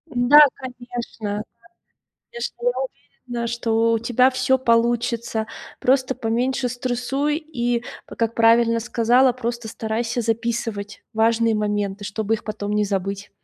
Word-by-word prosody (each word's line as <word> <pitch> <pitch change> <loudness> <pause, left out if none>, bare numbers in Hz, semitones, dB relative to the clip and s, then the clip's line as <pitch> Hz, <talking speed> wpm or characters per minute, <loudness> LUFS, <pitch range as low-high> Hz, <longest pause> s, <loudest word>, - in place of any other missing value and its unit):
Да, 245 +5 +7 0.2
конечно, 240 -4 -6 0.9
конечно, 475 -1 -5
я - - +3 0.6
уверена, 235 -1 -3
что 230 -1 +1
у 225 - +1
тебя 245 +2 +3
всё 265 +1 +2
получится. 235 -2 +1 0.3
Просто 260 0 +2
поменьше 250 +3 -1
стрессуй 255 +4 -1
и, 245 -7 -2 0.2
как 230 0 -2
правильно 230 0 +4
сказала, 245 +2 +3
просто 235 -2 -4
старайся 230 +2 -2
записывать 225 -2 -3
важные 225 +1 +2
моменты, 205 -1 -2
чтобы 215 +2 -2
их - - -11
потом 205 -1 -4
не 210 0 +2
забыть. 195 0 -3
235 Hz, 120 wpm, -22 LUFS, 220-245 Hz, 0.9 s, Да